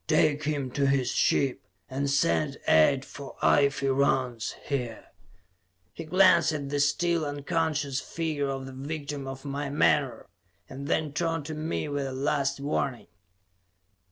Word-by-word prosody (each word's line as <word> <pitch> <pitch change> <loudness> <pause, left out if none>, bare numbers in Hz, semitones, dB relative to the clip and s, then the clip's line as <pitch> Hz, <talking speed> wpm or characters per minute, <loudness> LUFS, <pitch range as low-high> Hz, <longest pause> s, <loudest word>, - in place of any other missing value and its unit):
"Take 150 -1 +2
him 145 -4 -2
to 140 +1 +1
his 135 -2 +1
ship, 135 -3 +1 0.3
and 140 +2 -2
send 140 0 +1
aid 130 - +4
for 140 -2 -10
Ife 140 -1 +3
Rance, 130 -3 +1
here." 125 -5 -4 0.8
He 165 - -7
glanced 170 -2 +5
at 140 -2 -4
the 145 0 -1
still 165 +4 +2
unconscious 145 -1 -1
figure 155 -4 -2
of 135 -1 -4
the 135 - -9
victim 140 0 -5
of 135 +1 -7
my 140 0 -3
menore, 145 -2 +2 0.4
and 140 +2 -7
then 155 -2 0
turned 165 -1 -1
to 155 - -5
me 155 0 -3
with 145 -1 -2
a 130 - -5
last 140 +1 0
warning. 140 -3 -2
140 Hz, 145 wpm, -27 LUFS, 135-150 Hz, 0.8 s, glanced